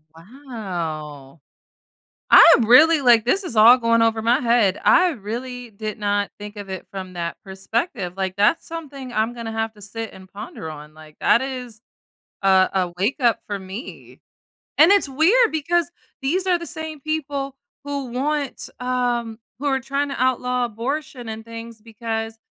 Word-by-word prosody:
Wow! 165 - -7 0.9
I 335 - +9
really 300 +8 +6
like, 235 -3 +5
this 385 +11 +1
is 355 - -5
all 225 +3 +8
going 230 -1 +2
over 225 -1 +2
my 240 +4 +3
head, 230 -6 +2
I 360 0 +5
really 245 +1 -6
did 215 +1 -6
not 205 -1 0
think 210 0 -9
of 205 -1 -8
it 190 -1 -6
from 185 -2 -7
that 170 -1 -4
perspective, 195 - -3
like, 190 -1 -2
that's 210 +11 +2
something 280 -6 -8
I'm 220 +1 0
gonna 230 -2 -6
have 225 0 -2
to 210 - -16
sit 225 +2 -6
and 190 0 -14
ponder 205 -5 -8
on, 150 0 -11
like, 155 -1 -15
that - - +4
is 250 -4 -6 0.6
a 190 -1 +5
a 180 -2 -1
wake 200 +8 0
up 240 -3 +2
for 205 - -3
me. 195 - -10 0.6
And 320 +5 +7
it's 400 -8 +3
weird 380 - +4
because 330 +2 0 0.3
these 360 +8 -1
are 360 -1 +3
the 340 - -7
same 315 -2 -6
people 285 -3 -3 0.3
who 285 -1 -4
want, 285 +2 -2
um, 245 -3 -1 0.2
who 290 - -5
are 270 -2 +1
tryna 275 +1 -2
outlaw 250 0 0
abortion 245 +2 -5
and 220 0 -6
things 230 -1 -9
because 225 0 -5
235 Hz, 165 wpm, -22 LUFS, 205-275 Hz, 0.9 s, I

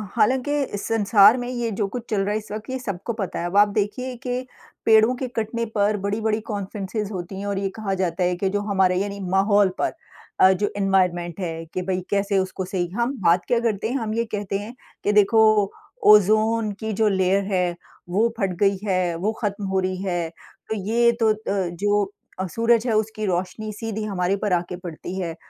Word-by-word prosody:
हालाँकि 265 +5 +2
इस 205 -6 -5
संसार 210 +1 +5
में 245 - -4
ये 240 -2 -2
जो 205 -3 0
कुछ 245 -2 -4
चल 205 -3 +1
रहा 205 - -1
है 215 - +1
इस 215 -1 -8
वक़्त 215 +3 -6
ये 260 - -2
सबको 200 -1 -4
पता 200 -5 -4
है। 170 - -2
अब 175 +2 -4
आप 205 +1 +7
देखिये 245 +5 -2
कि 250 +1 -2 0.4
पेड़ों 220 +2 +6
के 260 - -3
कटने 230 +1 -1
पर 210 0 +2
बड़ी-बड़ी 215 +2 -1
कॉन्फ़्रेंसिस 205 +1 -4
होती 190 0 -6
हैं 200 - -5
और 200 -1 -1
ये 195 - -1
कहा 210 -3 -2
जाता 180 0 0
है 180 0 +1
कि 190 +2 -1
जो 205 +1 -1
हमारे 190 -3 +2
यानी 200 0 -4
माहौल 200 +1 +4
पर - - 0 0.5
अ, 190 - +7
जो 205 +2 0
एनवायरनमेंट 180 -3 +1
है 165 -3 -4
कि 185 - -1
भई 185 -1 0
कैसे 200 0 +1
उसको 190 0 -3
सही 180 -2 -2
हम 240 +4 0
बात 175 +1 +3
क्या 240 - +2
करते 220 -2 -1
हैं, 250 - -2
हम 220 -4 -3
ये 230 - 0
कहते 200 -1 -2
हैं 220 +4 -8 0.3
कि 205 - +2
देखो 210 0 +4 0.4
ओज़ोन 215 +1 +4
की 220 0 -3
जो 220 +2 +2
लेयर 195 0 +2
है 180 -2 +1 0.3
वो 210 +6 +3
फट 195 -5 0
गई 200 -1 +3
है, 185 -3 +1
वो 200 +6 -1
ख़त्म 205 -2 -2
हो 190 0 +1
रही 185 0 -1
है। 175 -3 -1 0.4
तो 220 - -1
ये 230 +4 +2
तो 220 -1 +5
अ, - - -7
जो 195 +2 0 0.4
सूरज 230 +2 +2
है 225 - +1
उसकी 215 0 -2
रोशनी 190 +4 -2
सीधी 220 0 -4
हमारे 195 -2 0
पर 205 -2 -1
आके 175 +1 -1
पड़ती 180 +1 -7
है। 170 -3 -3
205 Hz, 205 wpm, -23 LUFS, 190-220 Hz, 0.5 s, आप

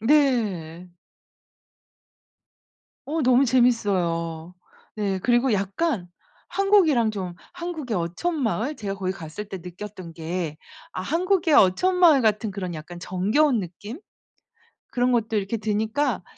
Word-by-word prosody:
네. 215 - +1 2.2
어 315 +3 -1
너무 255 -1 +4
재밌어요. 180 -10 +1 0.4
네. 200 -2 -1
그리고 240 +5 +2
약간 200 - -1 0.4
한국이랑 345 - +3
좀 185 -4 -5 0.2
한국의 340 -9 -4
어촌 270 - -2
마을 240 +6 -1
제가 200 -2 -4
거기 185 -1 -2
갔을 170 +2 -7
때 190 - -6
느꼈던 180 0 -9
게 165 -1 -4 0.4
아 - - -4
한국의 345 - +1
어촌 285 - +4
마을 320 -7 +6
같은 215 0 +1
그런 190 -3 -5
약간 170 +2 -8
정겨운 210 - +1
느낌? 205 - -8 0.9
그런 250 0 +1
것도 225 -2 +1
이렇게 200 +3 -2
드니까 220 +3 -1
215 Hz, 240 characters per minute, -24 LUFS, 185-270 Hz, 2.2 s, 마을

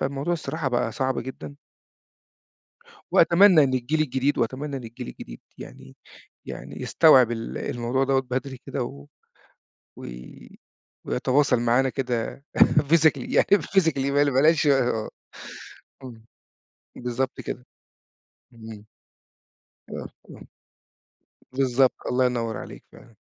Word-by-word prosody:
فالموضوع 140 +5 -2
الصراحة 155 -3 -3
بقى 120 -2 -1
صعب 130 +1 -1
جدًا. 80 - -7 1.6
وأتمنى 175 -2 +6
إن 130 -2 0
الجيل 135 +5 0
الجديد 135 0 0
وأتمنى 135 +5 -2
إن 130 - -9
الجيل 120 +2 -9
الجديد - - -10 0.2
يعني - - -12 0.5
يعني - - -8
يستوعب 130 -7 +5
ال 115 -1 -5
الموضوع 120 +3 -2
دوّة 135 0 +1
بدري 130 +1 -5
كده 130 - -3
و 70 -11 -9 0.9
وي - - -11 0.6
ويتواصل 130 0 +1
معانا 120 +3 +2
كده 125 0 -3 0.2
physically، 150 -2 +3
يعني - - +4 0.2
physically 160 -8 +1
بل 145 0 +3
بلاش 150 +4 +3 1.4
إمم. 115 -3 -11 0.7
بالضبط 125 +2 -3
كده. 125 - -7 0.9
إمم. 110 -2 -11 1.0
آه، - - -6 0.2
آه. - - -13 1.1
بالضبط، 130 -1 +2
الله 130 +1 +1
ينوّر 115 -3 -2
عليك - - -10
فعلًا. 115 - -18
130 Hz, 110 wpm, -24 LUFS, 120-140 Hz, 1.6 s, وأتمنى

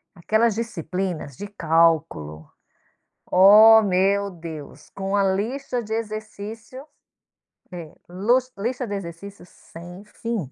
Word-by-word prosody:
aquelas 220 +6 +1
disciplinas 180 - -4
de 205 - -7
cálculo, 160 - 0 0.8
Ó 215 +4 +8
meu 200 +1 +1
Deus, 160 -4 -10
com 195 +1 -3
a 200 - +2
lista 240 +6 -2
de 220 0 -6
exercício 220 +3 -7 0.9
é, 170 -4 -9 0.2
lus 245 +8 0
lista 245 +4 -3
de 205 - -4
exercícios 195 +1 -9
sem 175 +4 -13
fim. 210 - -5
200 Hz, 110 wpm, -23 LUFS, 170-220 Hz, 0.9 s, Ó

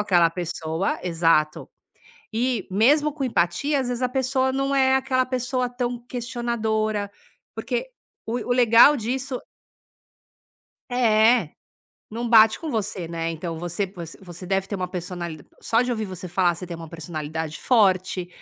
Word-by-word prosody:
aquela 175 -5 +4
pessoa. 165 0 -2
Exato. 165 -3 +1 0.6
E 235 -2 0
mesmo 290 +10 +3
com 280 -2 -3
empatia 255 - +1
as 255 - -3
vezes 245 0 -3
a - - +1
pessoa 260 0 0
num 275 +1 -1
é 265 -1 +4
aquela 260 -1 +1
pessoa 255 0 -1
tão 245 0 -3
questionadora, 220 -4 -2 0.5
porque - - -3 0.4
o 230 - -2
o - - +5
legal 235 +5 +7
disso 255 +2 -3 1.5
É, 225 -5 +4 0.6
não 235 +2 -3
bate 220 -1 +6
com 320 - -4
você, 210 -7 -2
né, 165 0 -3
então 165 0 -5
você 175 +4 -2
você 170 -3 -10
você 180 0 -10
deve 195 +1 0
ter 200 - -5
uma 180 -1 -3
personalida 175 -4 -6 0.2
Só 230 +1 +2
de 250 - -2
ouvir 220 -3 -1
você 185 -2 -7
falar, 175 0 +2
você 180 +2 -8
tem 170 -1 -6
uma 165 -1 -9
personalidade 160 -1 -5
forte. 185 -6 +2
215 Hz, 150 wpm, -24 LUFS, 175-250 Hz, 1.5 s, legal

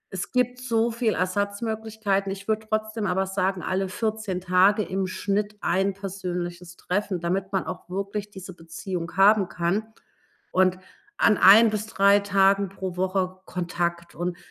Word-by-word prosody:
Es 180 - -4
gibt 250 0 0
so 235 -2 +1
viel 230 -1 0
Ersatzmöglichkeiten. 200 +1 -1
Ich 195 +1 -7
würde 220 0 -1
trotzdem 215 -1 -1
aber 190 +1 +1
sagen, 190 -1 -1
alle 190 0 -1
14 210 -2 -3
Tage 190 +4 +4
im 190 0 -2
Schnitt 205 +2 -2
ein 195 +2 +1
persönliches 180 -3 -5
Treffen. 195 0 -2
Damit 185 +3 -2
man 190 - 0
auch - - -7
wirklich 200 +2 -4
diese 190 -1 -9
Beziehung 170 +1 -6
haben 195 -1 +5
kann 190 +6 -1 0.6
und 185 0 +3 0.4
an 215 - +4
ein 220 +4 +8
bis 215 0 -3
3 200 -1 +4
Tagen 200 -1 +3
pro 190 -1 -6
Woche 185 0 -1
Kontakt. 170 -1 -3
Und 175 +2 -3
195 Hz, 150 wpm, -25 LUFS, 185-210 Hz, 0.6 s, ein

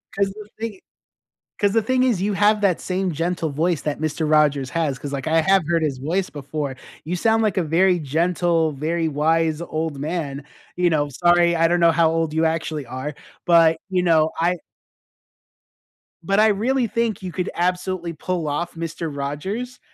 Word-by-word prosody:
'Cause 195 -1 +1
the 210 0 -11
thing 220 -4 -5 0.8
'cause 205 -1 +2
the 225 +2 +2
thing 255 +3 +1
is 235 -8 +1
you 205 +1 0
have 210 +2 +3
that 195 -4 +2
same 185 -1 -2
gentle 165 +1 -1
voice 160 +3 0
that 150 0 -3
Mister 155 +1 -1
Rogers 150 -3 +2
has 150 -6 -1
'cause, 145 -1 -6
like, 135 -2 -4
I 160 +1 +3
have 190 +2 +3
heard 165 -1 +2
his 140 -4 -1
voice 175 +7 -1
before. 145 -1 -5 0.3
You 175 +3 -2
sound 225 +4 +2
like 210 -5 +1
a 185 - +1
very 175 +4 +3
gentle, 165 +1 +1
very 160 +4 -1
wise 160 +1 +1
old 160 -3 -3
man, 145 -2 -4 0.3
you 180 0 +2
know, 150 -3 +1
sorry, 175 +3 +3
I 165 0 +3
don't 175 0 +2
know 170 -1 +5
how 165 -1 +3
old 165 -1 -1
you 160 +1 +1
actually 160 -2 -1
are, 130 +4 -6 0.3
but, 165 -2 +5
you 185 -1 +1
know, 160 -2 +3
I 175 +2 +1 1.7
but 195 +4 +1
I 215 - +6
really 235 +4 +1
think 230 -1 -1
you 185 -2 -5
could 180 0 -3
absolutely 180 -1 -1
pull 170 0 -3
off 160 +5 -3
Mister 165 0 -4
Rogers 150 - -4
165 Hz, 185 wpm, -22 LUFS, 155-185 Hz, 1.7 s, I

